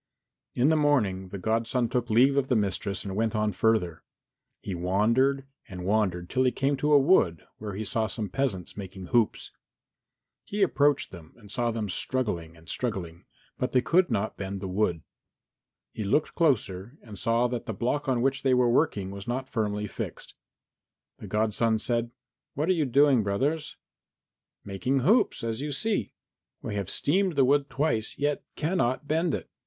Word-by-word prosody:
In 125 Hz, +4 st, +3 dB
the 160 Hz, -, +4 dB
morning 110 Hz, -12 st, +1 dB
the 100 Hz, -, -6 dB
godson 115 Hz, +4 st, 0 dB
took 120 Hz, 0 st, -2 dB
leave 125 Hz, +5 st, +5 dB
of 140 Hz, -1 st, +1 dB
the 125 Hz, -, +2 dB
mistress 100 Hz, -2 st, -1 dB
and 95 Hz, -1 st, -4 dB
went 110 Hz, +1 st, 0 dB
on 105 Hz, 0 st, +1 dB
further. 95 Hz, -4 st, +1 dB, 0.6 s
He 100 Hz, -, -5 dB
wandered 115 Hz, +10 st, +1 dB, 0.2 s
and 90 Hz, -2 st, -7 dB
wandered 95 Hz, -4 st, 0 dB
till 130 Hz, +7 st, +1 dB
he 125 Hz, -, +3 dB
came 140 Hz, +2 st, 0 dB
to 150 Hz, +2 st, +1 dB
a -, -, +9 dB
wood 135 Hz, -, +3 dB
where 105 Hz, -2 st, -5 dB
he 105 Hz, -, -3 dB
saw 110 Hz, +2 st, -1 dB
some 105 Hz, 0 st, -4 dB
peasants 100 Hz, -6 st, -2 dB
making 95 Hz, -2 st, -8 dB
hoops. 115 Hz, -3 st, +1 dB, 0.9 s
He 205 Hz, 0 st, -1 dB
approached 145 Hz, -5 st, +2 dB
them 85 Hz, -4 st, -13 dB
and 105 Hz, -4 st, -14 dB
saw 120 Hz, 0 st, 0 dB
them 110 Hz, -2 st, -2 dB
struggling 90 Hz, -7 st, -2 dB
and 80 Hz, 0 st, -19 dB
struggling, 90 Hz, -9 st, -4 dB, 0.3 s
but 125 Hz, -, -2 dB
they 125 Hz, -, +4 dB
could 175 Hz, 0 st, +3 dB
not 110 Hz, -2 st, -1 dB
bend 100 Hz, 0 st, -4 dB
the 95 Hz, -, -5 dB
wood. 90 Hz, -4 st, 0 dB, 0.9 s
He -, -, -5 dB
looked 110 Hz, +9 st, +1 dB
closer 120 Hz, -, 0 dB
and 105 Hz, -4 st, -10 dB
saw 115 Hz, +2 st, +2 dB
that 120 Hz, -1 st, -4 dB
the -, -, -1 dB
block 125 Hz, +7 st, -1 dB
on 125 Hz, -2 st, +1 dB
which 135 Hz, 0 st, +1 dB
they 130 Hz, -2 st, +3 dB
were 125 Hz, -1 st, +3 dB
working 105 Hz, -8 st, +1 dB
was 100 Hz, +1 st, -8 dB
not 130 Hz, +2 st, -2 dB
firmly 105 Hz, -2 st, -1 dB
fixed. 100 Hz, -, -6 dB, 0.9 s
And -, -, -9 dB
the -, -, -9 dB
godson 110 Hz, +1 st, +1 dB
said, 120 Hz, +1 st, -1 dB, 0.5 s
"What 155 Hz, +5 st, -1 dB
are -, -, +5 dB
you 160 Hz, -4 st, +1 dB
doing, 140 Hz, -1 st, +4 dB
brothers?" 135 Hz, +10 st, -1 dB, 0.9 s
"Making 125 Hz, +8 st, -1 dB
hoops, 195 Hz, -, +3 dB
as 115 Hz, +2 st, -2 dB
you 150 Hz, 0 st, -3 dB
see. 210 Hz, +10 st, -1 dB, 0.5 s
We -, -, -4 dB
have 100 Hz, -2 st, -3 dB
steamed 185 Hz, +3 st, +1 dB
the 135 Hz, -2 st, +4 dB
wood 140 Hz, +1 st, +2 dB
twice, 135 Hz, -5 st, -1 dB
yet 145 Hz, 0 st, 0 dB
cannot 150 Hz, -4 st, 0 dB
bend 160 Hz, +1 st, +1 dB
it. -, -, -6 dB
115 Hz, 180 wpm, -27 LUFS, 100-140 Hz, 0.9 s, a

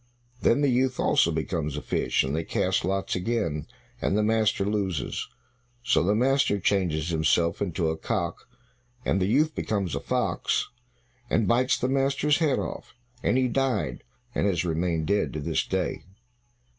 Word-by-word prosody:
Then 130 Hz, +5 st, +3 dB
the 145 Hz, -, +3 dB
youth 130 Hz, +1 st, +1 dB
also -, -, +3 dB
becomes 80 Hz, -2 st, -2 dB
a -, -, -3 dB
fish, -, -, +1 dB
and 65 Hz, +2 st, -2 dB
they 80 Hz, -, -1 dB
cast 95 Hz, +3 st, 0 dB
lots 95 Hz, +2 st, -1 dB
again, 90 Hz, -7 st, -1 dB, 0.3 s
and 100 Hz, -, +1 dB
the 105 Hz, -, +2 dB
master 110 Hz, -2 st, +2 dB
loses. 100 Hz, -, -2 dB, 0.6 s
So 115 Hz, -10 st, +3 dB
the 100 Hz, +5 st, +2 dB
master 130 Hz, -3 st, +2 dB
changes 90 Hz, -5 st, 0 dB
himself 85 Hz, +1 st, +1 dB
into 85 Hz, -4 st, 0 dB
a -, -, -2 dB
cock, 85 Hz, +5 st, -3 dB, 0.6 s
and 95 Hz, -, +1 dB
the 95 Hz, -, +2 dB
youth 155 Hz, +9 st, +2 dB
becomes 100 Hz, -6 st, -2 dB
a -, -, -1 dB
fox, -, -, -1 dB, 0.6 s
and 110 Hz, -, +2 dB
bites 125 Hz, +2 st, +3 dB
the 125 Hz, -, -1 dB
master's 140 Hz, +3 st, +2 dB
head 150 Hz, -5 st, +2 dB
off, -, -, -5 dB, 0.3 s
and 125 Hz, -, +2 dB
he 130 Hz, -1 st, +3 dB
died 120 Hz, -, -1 dB, 0.3 s
and -, -, +1 dB
has 90 Hz, -3 st, 0 dB
remained 85 Hz, -1 st, 0 dB
dead 100 Hz, +3 st, 0 dB
to 75 Hz, -, -3 dB
this 70 Hz, -, 0 dB
day. -, -, -1 dB
100 Hz, 165 wpm, -26 LUFS, 85-120 Hz, 0.6 s, Then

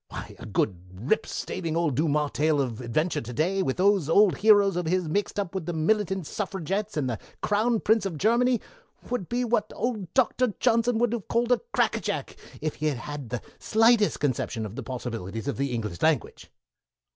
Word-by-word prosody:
Why, -, -, -8 dB
a -, -, -8 dB
good, 95 Hz, -3 st, 0 dB, 0.2 s
rip 125 Hz, -, 0 dB
staving 165 Hz, -3 st, -3 dB
old 165 Hz, -4 st, +1 dB
Dumas 150 Hz, 0 st, +1 dB
tale 150 Hz, 0 st, +2 dB
of 125 Hz, -4 st, -2 dB
adventure 150 Hz, +8 st, 0 dB
of -, -, -8 dB
to 120 Hz, -, -6 dB
day, 180 Hz, +9 st, +1 dB
with 130 Hz, -8 st, -1 dB
those 190 Hz, -4 st, +3 dB
old 200 Hz, +2 st, +5 dB
heroes 205 Hz, -2 st, +5 dB
of 175 Hz, -2 st, -2 dB
his 180 Hz, 0 st, +1 dB
mixed 205 Hz, +5 st, -1 dB
up 195 Hz, -3 st, -3 dB
with 190 Hz, -4 st, -4 dB
the 175 Hz, -, -1 dB
Militant 190 Hz, +2 st, +1 dB
Suffragettes 195 Hz, +1 st, -3 dB
and 140 Hz, -3 st, 0 dB
the 115 Hz, -5 st, -3 dB, 0.2 s
Crown 220 Hz, +2 st, +2 dB
Prince 215 Hz, -2 st, +3 dB
of 170 Hz, -5 st, -6 dB
Germany, 235 Hz, +5 st, +3 dB, 0.5 s
would 245 Hz, -8 st, -2 dB
be 245 Hz, +1 st, 0 dB
what 220 Hz, -3 st, 0 dB
old 215 Hz, -7 st, -3 dB
Doctor 255 Hz, -3 st, +2 dB
Johnson 235 Hz, -1 st, +2 dB
would 240 Hz, 0 st, +1 dB
have 230 Hz, -5 st, -4 dB
called 235 Hz, +1 st, +1 dB
a 245 Hz, -, +3 dB
cracker -, -, +2 dB
jack, -, -, -4 dB, 0.3 s
if 155 Hz, -1 st, -3 dB
he 155 Hz, -, -1 dB
had 145 Hz, -4 st, 0 dB
had 145 Hz, 0 st, -7 dB
the 125 Hz, -1 st, -4 dB, 0.2 s
slightest 225 Hz, -1 st, +3 dB
conception 125 Hz, -5 st, -1 dB
of 105 Hz, +1 st, -7 dB
the 135 Hz, -, -4 dB
possibilities 115 Hz, -3 st, -5 dB
of 140 Hz, -, -2 dB
the 140 Hz, -1 st, -1 dB
English 105 Hz, -7 st, -4 dB
language." 155 Hz, -7 st, 0 dB
175 Hz, 200 wpm, -26 LUFS, 140-215 Hz, 0.5 s, old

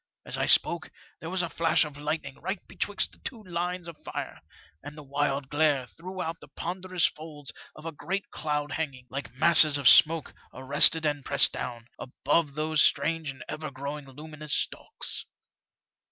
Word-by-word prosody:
As -, -, -5 dB
I -, -, -1 dB
spoke, 170 Hz, -2 st, +3 dB, 0.3 s
there 165 Hz, -, -7 dB
was 185 Hz, 0 st, -1 dB
a -, -, -2 dB
flash 165 Hz, -1 st, +2 dB
of 150 Hz, -2 st, -9 dB
lightning 145 Hz, -1 st, -5 dB
right 190 Hz, +6 st, -3 dB
betwixt 200 Hz, -2 st, -1 dB
the -, -, -17 dB
two 230 Hz, -4 st, -7 dB
fine 180 Hz, -3 st, -14 dB
lines 175 Hz, +1 st, -3 dB
of 165 Hz, -3 st, -11 dB
fire, -, -, -7 dB, 0.4 s
and 145 Hz, +1 st, -10 dB
the 150 Hz, -, -10 dB
wild 140 Hz, 0 st, -2 dB
glare 145 Hz, -2 st, +1 dB
threw 180 Hz, +7 st, -8 dB
out 165 Hz, +1 st, -5 dB
the -, -, -14 dB
ponderous 180 Hz, 0 st, -2 dB
folds 150 Hz, -2 st, -5 dB, 0.2 s
of 155 Hz, -, -13 dB
a 165 Hz, -, -4 dB
great 195 Hz, +6 st, -5 dB
cloud 150 Hz, -1 st, -3 dB
hanging, 135 Hz, -6 st, -4 dB
like 140 Hz, +2 st, -6 dB
masses 155 Hz, 0 st, +7 dB
of 140 Hz, -3 st, +1 dB
smoke 160 Hz, +3 st, +6 dB, 0.2 s
arrested 140 Hz, +5 st, +5 dB
and 145 Hz, -2 st, -1 dB
pressed -, -, +5 dB
down, 120 Hz, -2 st, -6 dB
above 145 Hz, +3 st, -1 dB
those 155 Hz, 0 st, +2 dB
strange 155 Hz, +2 st, +2 dB
and 135 Hz, -, -8 dB
ever 155 Hz, 0 st, -5 dB
growing 140 Hz, +1 st, -7 dB
luminous 150 Hz, +2 st, -6 dB
stalks. -, -, -3 dB
155 Hz, 175 wpm, -27 LUFS, 140-165 Hz, 0.4 s, masses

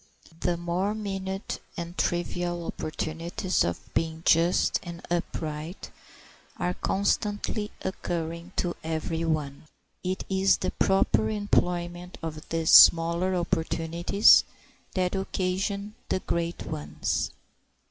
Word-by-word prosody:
The 175 Hz, -1 st, 0 dB
more 175 Hz, +5 st, -1 dB
minute 195 Hz, -2 st, -4 dB, 0.2 s
and 170 Hz, 0 st, -5 dB
trivial 175 Hz, -1 st, -1 dB
opportunities 165 Hz, +4 st, -2 dB
of 85 Hz, -, -4 dB
being 160 Hz, 0 st, -1 dB
just 170 Hz, +2 st, +4 dB
and 170 Hz, -1 st, -8 dB
upright 160 Hz, 0 st, -3 dB, 0.7 s
are 180 Hz, 0 st, 0 dB
constantly 205 Hz, +2 st, -1 dB
occurring 170 Hz, -1 st, -4 dB
to 175 Hz, -1 st, -1 dB
every 160 Hz, +1 st, -2 dB
one. 150 Hz, -3 st, -2 dB, 0.4 s
It 185 Hz, +1 st, -2 dB
is 190 Hz, 0 st, +3 dB
the -, -, -2 dB
proper 110 Hz, -, +2 dB
employment 180 Hz, -4 st, -1 dB
of 155 Hz, -1 st, -6 dB
these 165 Hz, -1 st, +1 dB
smaller 170 Hz, +3 st, +7 dB
opportunities 170 Hz, +3 st, +4 dB, 0.5 s
that 180 Hz, -1 st, +1 dB
occasion 195 Hz, +2 st, -2 dB, 0.2 s
the -, -, +1 dB
great 170 Hz, 0 st, -2 dB
ones. 75 Hz, 0 st, -2 dB
175 Hz, 105 wpm, -27 LUFS, 165-190 Hz, 0.7 s, smaller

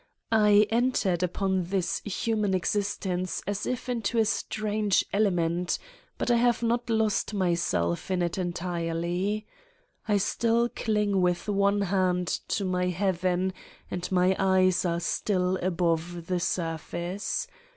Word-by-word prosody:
I 210 Hz, -1 st, +5 dB
entered 225 Hz, -7 st, +1 dB
upon 185 Hz, 0 st, 0 dB
this 180 Hz, -1 st, -1 dB
human 210 Hz, -1 st, 0 dB
existence 185 Hz, -1 st, -1 dB
as 205 Hz, 0 st, -2 dB
if 250 Hz, 0 st, -3 dB
into 235 Hz, -2 st, -1 dB
a 225 Hz, -, +4 dB
strange 215 Hz, -2 st, 0 dB
element, 180 Hz, -4 st, +1 dB, 0.4 s
but -, -, 0 dB
I 240 Hz, -, +5 dB
have 240 Hz, 0 st, +2 dB
not 235 Hz, +1 st, 0 dB
lost 220 Hz, -1 st, +1 dB
myself 170 Hz, -, 0 dB
in 185 Hz, -2 st, +1 dB
it 170 Hz, -1 st, -1 dB
entirely: 175 Hz, +3 st, -2 dB, 0.6 s
I 210 Hz, -1 st, +3 dB
still 230 Hz, +4 st, +1 dB
cling 210 Hz, -4 st, 0 dB
with 180 Hz, +1 st, 0 dB
one 200 Hz, 0 st, +2 dB
hand 185 Hz, -2 st, +1 dB, 0.2 s
to 200 Hz, -, -1 dB
my 180 Hz, -1 st, 0 dB
Heaven 185 Hz, 0 st, 0 dB, 0.4 s
and 180 Hz, +1 st, -4 dB
my 185 Hz, +1 st, +3 dB
eyes 185 Hz, -1 st, +3 dB
are 170 Hz, -1 st, 0 dB
still 185 Hz, +1 st, 0 dB
above 170 Hz, -1 st, -1 dB
the 180 Hz, +1 st, -1 dB
surface. 170 Hz, +3 st, -2 dB
190 Hz, 130 wpm, -27 LUFS, 175-210 Hz, 0.6 s, I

